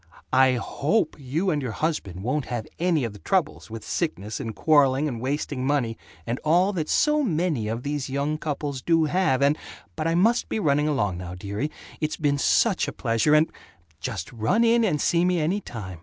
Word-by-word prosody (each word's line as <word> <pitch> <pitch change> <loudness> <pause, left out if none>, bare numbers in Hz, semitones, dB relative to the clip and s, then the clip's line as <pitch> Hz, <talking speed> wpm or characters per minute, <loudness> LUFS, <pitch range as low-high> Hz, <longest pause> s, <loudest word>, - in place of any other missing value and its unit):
" - - -28
I 130 - +3
HOPE 150 - 0
you 155 +8 -1
and 150 -2 0
your 125 -5 -4
husband 100 - -2
won't 130 +5 -1
have 120 -3 -4
any 170 -4 +2
of 115 -3 -3
the 105 - -12
troubles, 185 - -1
with 110 -1 -8
sickness 110 - -3
and 115 -5 -5
quarreling 145 +2 +3
and 120 -5 -4
wasting 135 0 -2
money 130 -5 0 0.3
and 120 +2 -2
all 180 +6 +3
that 160 -5 -2
so 300 0 +3
many 165 - 0
of 115 +3 -3
these 145 -2 -3
young 140 +3 -1
couples 145 -3 -3
do 165 +3 +3
have 155 -5 +2
and 140 +2 +4 0.4
But 155 0 -2
I 165 - +1
must 225 +7 +2
be - - -1
running 150 -4 +2
along 105 -12 0
now, 90 0 -6
dearie. 100 +10 -3 0.3
It's 155 -1 -2
been 145 -2 +1
such 200 +5 +3
a - - -3
pleasure 115 +5 +2
and 155 +1 +3 0.5
Just 110 -5 -5
run 150 - +2
in 235 0 +4
and 175 -9 +1
see 170 +3 +2
me 180 -1 +2
any 170 +6 0
time. 95 - -8
145 Hz, 200 wpm, -25 LUFS, 120-165 Hz, 0.5 s, and